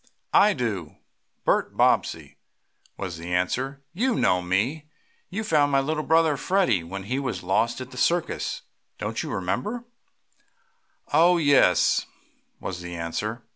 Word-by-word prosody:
"I 210 Hz, +1 st, +6 dB
do 105 Hz, -, -3 dB, 0.5 s
Bert -, -, +1 dB
Bobbsey," -, -, +1 dB, 0.6 s
was 90 Hz, -4 st, -5 dB
the 85 Hz, +1 st, -7 dB
answer. 130 Hz, +10 st, -1 dB
"You 240 Hz, +6 st, +1 dB
know 90 Hz, -, +2 dB
me. 115 Hz, -, -1 dB, 0.4 s
You 215 Hz, +4 st, -3 dB
found 150 Hz, -8 st, +2 dB
my 135 Hz, -, +4 dB
little 155 Hz, +3 st, -1 dB
brother 160 Hz, -1 st, +3 dB
Freddie, 180 Hz, -, +1 dB
when 95 Hz, +3 st, -6 dB
he 125 Hz, +7 st, -2 dB
was 135 Hz, -8 st, -3 dB
lost 95 Hz, +7 st, +1 dB
at 130 Hz, 0 st, -8 dB
the 125 Hz, -, -11 dB
circus. 170 Hz, +6 st, 0 dB, 0.3 s
Don't -, -, -3 dB
you -, -, -5 dB
remember?" 165 Hz, -, -2 dB, 1.3 s
"Oh 170 Hz, +4 st, +5 dB
yes," 145 Hz, -4 st, +4 dB, 0.5 s
was 90 Hz, -2 st, -5 dB
the 90 Hz, 0 st, -7 dB
answer. 105 Hz, +8 st, -4 dB
130 Hz, 135 wpm, -25 LUFS, -, 1.3 s, I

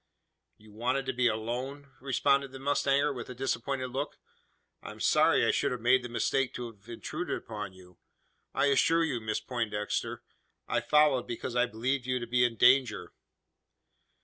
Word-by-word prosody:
"You 105 Hz, 0 st, -18 dB
wanted 125 Hz, +5 st, -1 dB
to 130 Hz, -, -2 dB
be 125 Hz, 0 st, +2 dB
alone?" 125 Hz, +6 st, -3 dB
responded 140 Hz, +1 st, +1 dB
the 135 Hz, -, -8 dB
mustanger, 140 Hz, +1 st, +1 dB
with 125 Hz, -2 st, -7 dB
a 125 Hz, -, -7 dB
disappointed 130 Hz, 0 st, -2 dB
look. 135 Hz, +3 st, -3 dB, 0.6 s
"I -, -, -8 dB
am -, -, -10 dB
sorry -, -, +4 dB
I -, -, +3 dB
should 140 Hz, -, 0 dB
have 125 Hz, -, -3 dB
made 125 Hz, +3 st, +4 dB
the 125 Hz, -, -7 dB
mistake 130 Hz, +2 st, 0 dB
to 120 Hz, -1 st, -5 dB
have 105 Hz, +1 st, -21 dB
intruded 155 Hz, +8 st, -4 dB
upon 105 Hz, -4 st, -7 dB
you. 90 Hz, -1 st, -17 dB, 0.5 s
I -, -, +1 dB
assure 160 Hz, +4 st, +3 dB
you, 135 Hz, -8 st, -1 dB
Miss 110 Hz, -1 st, -2 dB
Poindexter, 110 Hz, -4 st, -3 dB, 0.4 s
I 120 Hz, -, +1 dB
followed, 145 Hz, 0 st, +3 dB
because 120 Hz, +1 st, -5 dB
I 120 Hz, 0 st, +3 dB
believed 125 Hz, +3 st, -2 dB
you 130 Hz, 0 st, +1 dB
to 120 Hz, -, -4 dB
be 125 Hz, +1 st, +2 dB
in 120 Hz, -1 st, +1 dB
danger." 125 Hz, +2 st, +3 dB
125 Hz, 175 wpm, -30 LUFS, 115-135 Hz, 0.6 s, sorry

